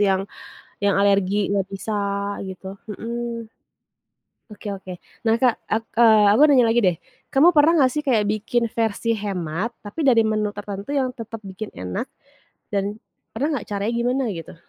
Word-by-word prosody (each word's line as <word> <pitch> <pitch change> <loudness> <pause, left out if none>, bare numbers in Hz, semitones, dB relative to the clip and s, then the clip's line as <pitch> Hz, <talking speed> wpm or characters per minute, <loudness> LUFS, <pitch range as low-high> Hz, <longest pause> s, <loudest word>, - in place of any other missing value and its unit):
yang 195 -1 +2 0.6
yang 200 -1 +3
alergi, 200 0 +2
nggak 195 -2 0
bisa 210 +2 -4 0.5
gitu, 190 +1 -8 0.2
mhm. 235 +1 -5 1.0
Oke 210 0 -9
oke. 185 -2 -9 0.2
Nah, 225 0 +2
Kak, 250 -3 +4 0.2
ak 225 +1 +1 0.2
eee, 220 -3 +7
aku 220 - +4
nanya 260 -5 +5
lagi 230 +1 +3
deh, 180 -3 +3 0.3
kamu 295 +5 +6
pernah 300 +3 +6
gak 255 - +1
sih 300 - -1
kayak 225 -5 +3
bikin 225 +3 0
versi 225 0 -1
hemat 195 0 -3
tapi 290 +10 -4
dari 240 -4 +5
menu 215 -1 0
tertentu 205 +2 -6
yang 260 -3 0
tetep 225 -2 -7
bikin 195 +2 -7
enak 90 0 -4 0.6
dan 205 +2 -2 0.3
pernah 285 +6 0
gak, - - -11
caranya 205 +3 -1
gimana 250 +3 +1
gitu? 165 -1 -8
215 Hz, 160 wpm, -22 LUFS, 200-235 Hz, 1.0 s, eee